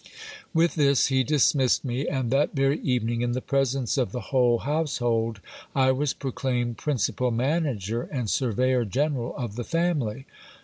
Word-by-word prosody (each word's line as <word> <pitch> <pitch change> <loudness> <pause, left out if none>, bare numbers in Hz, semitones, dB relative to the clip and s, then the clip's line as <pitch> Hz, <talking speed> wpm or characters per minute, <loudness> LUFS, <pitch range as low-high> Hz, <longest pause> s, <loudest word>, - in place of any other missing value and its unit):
With 165 +1 +2
this 140 -4 +3
he 130 -1 +2
dismissed 135 -1 +2
me; 130 +3 -2
and 130 -4 -1
that 140 +3 +1
very 135 +2 +2
evening, 120 -2 -1
in 120 0 0
the 130 - -1
presence 135 -1 0
of 125 -7 0
the 125 -1 -7
whole 125 -2 +4
household, 120 -7 -1 0.3
I 130 -1 +4
was 135 +2 -1
proclaimed 125 -3 -2
principal 125 -3 0
manager 120 - -1
and 125 -6 -2
surveyor 125 +2 +1
general 130 +2 -1
of 120 -5 -5
the 120 - -2
family. 145 -7 -1
130 Hz, 150 wpm, -26 LUFS, 120-140 Hz, 0.3 s, whole